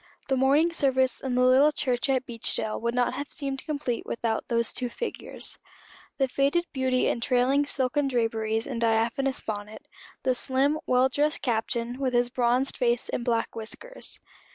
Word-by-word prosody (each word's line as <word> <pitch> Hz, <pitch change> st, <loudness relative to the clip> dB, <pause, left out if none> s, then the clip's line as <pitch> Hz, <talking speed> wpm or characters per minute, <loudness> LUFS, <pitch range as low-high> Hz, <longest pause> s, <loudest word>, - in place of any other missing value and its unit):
The 265 Hz, -, +3 dB
morning 285 Hz, +6 st, +3 dB
service 260 Hz, -4 st, +2 dB
in 260 Hz, -2 st, -2 dB
the 250 Hz, -, +3 dB
little 265 Hz, +4 st, +6 dB
church 255 Hz, -3 st, -1 dB
at 260 Hz, -1 st, +1 dB
Beechdale 230 Hz, -3 st, -2 dB
would 235 Hz, +1 st, -1 dB
not 250 Hz, 0 st, +1 dB
have 285 Hz, +2 st, -5 dB
seemed 275 Hz, -2 st, -2 dB
complete 285 Hz, -6 st, -2 dB
without 230 Hz, -1 st, -2 dB
those 235 Hz, -1 st, +1 dB
two 245 Hz, -, -1 dB
figures. 470 Hz, -, -4 dB, 0.6 s
The 270 Hz, -, +2 dB
faded 280 Hz, +7 st, +1 dB
beauty 260 Hz, -2 st, +1 dB
in 235 Hz, -, -1 dB
trailing 260 Hz, +4 st, +2 dB
silken 275 Hz, +1 st, 0 dB
draperies 225 Hz, -3 st, 0 dB
and 235 Hz, -4 st, -4 dB
diaphanous 230 Hz, +4 st, +1 dB
bonnet, 210 Hz, 0 st, -6 dB, 0.4 s
the 260 Hz, -, +2 dB
slim, 270 Hz, +4 st, +1 dB
well 255 Hz, +1 st, +4 dB
dressed 295 Hz, +3 st, 0 dB
Captain, 235 Hz, 0 st, -1 dB
with 260 Hz, -2 st, -1 dB
his 240 Hz, 0 st, +2 dB
bronzed 250 Hz, +2 st, +1 dB
face 240 Hz, -1 st, +1 dB
and 240 Hz, -, -2 dB
black 230 Hz, -2 st, -1 dB
whiskers. 470 Hz, -, -4 dB
255 Hz, 165 wpm, -27 LUFS, 235-275 Hz, 0.6 s, little